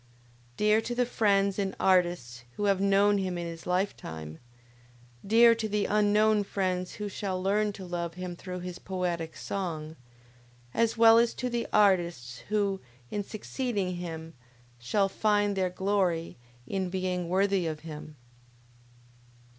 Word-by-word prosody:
Dear 210 +1 +3
to 240 +2 -4
the 245 0 +2
friends 200 -4 +2
and 195 -1 -1
artists 175 -11 +1
who 205 - -3
have 195 -1 +2
known 200 +1 +4
him 185 -2 -2
in 170 - -4
his 165 0 -8
lifetime, 80 - -3 0.8
dear 230 +3 +6
to 225 -1 -3
the 210 0 0
unknown 210 0 +3
friends 185 -2 -2
who 210 - -4
shall 190 -2 -3
learn 205 +3 +1
to 195 -2 -9
love 170 -1 -4
him 180 -1 -5
through 180 0 -7
his 180 0 -6
poetic 175 -3 -3
song, 160 -5 -4 0.8
as 230 0 +1
well 225 0 +8
as 235 0 +2
to 250 -1 -3
the 235 -1 -1
artists 170 -12 +2
who, 200 -2 0 0.3
in 205 - -2
succeeding 205 -3 -3
him, 165 -2 -6 0.5
shall 195 - +1
find 205 0 +1
their 185 -1 +1
glory 180 -3 0 0.3
in 190 +5 -2
being 180 -1 -2
worthy 190 -1 +2
of 155 -1 -4
him! 155 -1 -9
190 Hz, 145 wpm, -29 LUFS, 175-205 Hz, 0.8 s, well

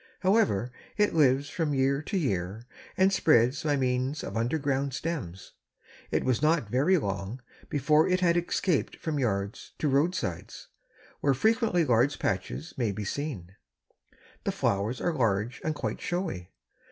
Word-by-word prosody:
However, 185 - +2 0.3
it 210 -1 +3
lives 140 -3 +3
from 155 -4 -1
year 135 +1 +2
to 195 +6 -3
year 100 - -2 0.3
and 190 +1 +4
spreads 135 -4 +3
by 150 -2 +1
means 130 +2 -1
of - - -6
underground 135 +2 0
stems. 135 - -5 0.6
It - - 0
was 130 -2 +1
not 155 -5 +2
very 150 +9 +3
long 100 - -3 0.3
before 150 +2 +3
it 185 0 +2
had 170 -2 +3
escaped 175 -1 0
from 155 -3 -3
yards 100 -3 -2
to 155 - 0
roadsides, 140 - -1 0.5
where 140 -2 +2
frequently 220 - +2
large 125 +2 +2
patches 100 - -3
may 115 -5 0
be 105 +1 -5
seen. 100 - -5 0.9
The - - 0
flowers 100 +5 -1
are 175 - 0
large 115 -4 0
and 155 -1 -1
quite - - -4
showy. 170 - -3
140 Hz, 145 wpm, -28 LUFS, 115-160 Hz, 0.9 s, and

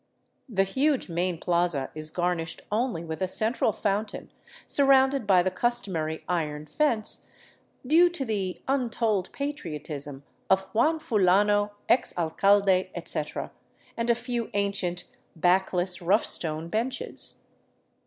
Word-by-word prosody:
The 195 -4 +2
huge 265 +5 0
main 175 +1 -1
plaza 170 -5 0
is 155 0 -4
garnished 175 -1 -2
only 220 -5 -1
with 160 +2 -6
a 185 - +1
central 220 +4 0
fountain 205 +1 -3 0.3
surrounded 270 -3 +3
by 185 -2 +5
the 185 - 0
customary 185 -8 -1
iron 150 -4 -2
fence, 230 - -1 0.3
" - - -31
due 335 +6 +5
to 340 -6 -4
the 195 -5 -3
untold 230 -7 0
patriotism 150 - -5 0.3
of 190 0 +4
Juan 310 +9 +3
Fu 245 -9 -1
lano, 205 +2 +3
ex 245 - +2
alcalde, 190 +3 +3
etc.," 155 -3 -3 0.4
and 230 0 -2
a 235 - +5
few 240 -1 -3
ancient, 200 -3 -1 0.3
backless, 180 +1 +1
rough 190 +6 +3
stone 160 0 +1
benches. 250 - 0
195 Hz, 125 wpm, -27 LUFS, 175-235 Hz, 0.4 s, by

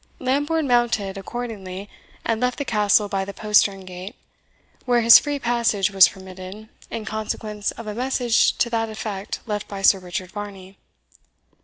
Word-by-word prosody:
Lambourne 290 +4 0
mounted, 235 -5 +1
accordingly, 200 -2 -6 0.4
and 230 0 0
left 250 0 0
the 285 - -3
Castle 210 -2 +3
by 195 -1 -1
the 200 +1 -8
postern 210 -2 +2
gate, 185 +5 -8 0.7
where 245 -2 +3
his 230 0 +9
free 290 -1 -3
passage 235 -6 +1
was 195 -2 +8
permitted, 190 +3 -10 0.2
in 220 -2 -5
consequence 215 -1 -3
of 230 - -7
a 210 - -4
message 245 0 +1
to - - +2
that 225 -1 0
effect 210 -2 -5
left 210 -2 -3
by 195 -1 -7
Sir 195 - +6
Richard 180 0 -6
Varney. 200 -2 -8
210 Hz, 155 wpm, -22 LUFS, 195-235 Hz, 0.7 s, his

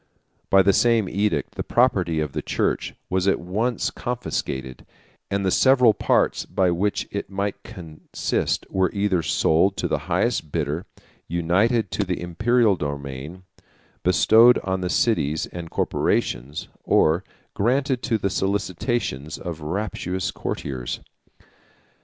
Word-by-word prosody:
By 95 0 +6
the 100 +1 +4
same 115 -3 +3
edict, 95 -8 -1
the - - -4
property 95 -10 +2
of 75 -2 -2
the - - -2
church - - -1
was 95 +1 0
at 95 - +3
once 110 +8 -1
confiscated; 65 - -4 0.5
and 100 0 -1
the 95 - +2
several 125 -2 +5
parts - - +1
of 90 -2 +1
which 100 +4 -1
it 100 - -4
might 100 0 -3
consist 80 -4 -3
were 95 -1 +2
either 100 -3 +1
sold 85 +4 +2
to - - -1
the - - 0
highest 75 - 0
bidder, 75 +6 -2 0.4
united 95 +6 +1
to 105 - 0
the 90 -2 -3
Imperial 110 +5 +2
domain, 70 +3 -6 0.6
bestowed 110 +6 +6
on 95 -1 -1
the 90 - -2
cities 80 -9 +1
and 85 -2 -8
corporations, 65 0 -1 0.2
or 80 +5 +3 0.3
granted 130 +4 +1
to 115 -3 0
the 100 -2 -1
solicitations 95 - -2
of 85 -3 -6
rapacious 90 +2 -3
courtiers. 65 -3 -4
95 Hz, 130 wpm, -23 LUFS, 80-105 Hz, 0.6 s, By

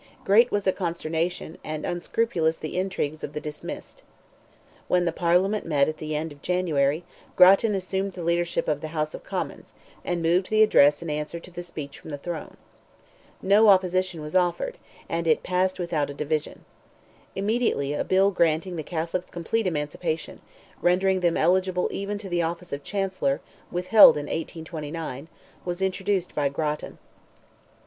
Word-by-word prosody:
Great 230 +4 +5
was 205 -1 0
the 190 - +2
consternation, 170 -1 -3
and 155 0 -4
unscrupulous 175 -2 0
the 155 - -6
intrigues 180 -5 -2
of 145 - -5
the 150 - -3
dismissed. 150 -1 -8 0.9
When 180 -1 +2
the 170 - +1
Parliament 180 +5 +2
met 145 -4 +2
at 155 - -3
the 155 0 -3
end 155 +1 -2
of 145 -1 -14
January, 160 -4 +1 0.3
Grattan 195 +4 +6
assumed 190 +1 -2
the 175 - -6
leadership 170 +1 0
of 145 -1 0
the 155 - -4
House 155 0 -1
of - - -8
Commons, - - -5 0.3
and 175 -1 -2
moved 175 +3 +2
the 215 0 +5
address 145 -7 +5
in 165 - -4
answer 150 +3 -3
to 180 - -14
the 175 0 -6
speech 155 -5 -8
from - - -11
the 145 - -4
throne. 160 +2 -6 0.9
No 205 +3 +5
opposition 185 -3 +3
was 150 - -7
offered—and 175 - -2
it 155 - +3
passed 185 +1 0
without 165 -5 -1
a 140 - -7
division. 150 +1 -3 0.7
Immediately, 200 - 0
a 145 - -1
bill 195 +1 +3
granting 170 0 +1
the - - -2
Catholics 170 +3 -3
complete 190 +5 -1
emancipation—rendering 175 +4 -1
them 175 -2 +1
eligible 180 +2 +2
even 200 +1 -3
to 205 -1 -8
the 175 -2 0
office 170 +1 -4
of 140 0 -4
Chancellor, 190 -8 -1 0.3
withheld 180 +1 +7
in 145 - -3
1829—was 160 +1 -6
introduced 190 -1 -1
by 145 -2 +1
Grattan. 150 +1 -3
175 Hz, 155 wpm, -25 LUFS, 155-185 Hz, 0.9 s, withheld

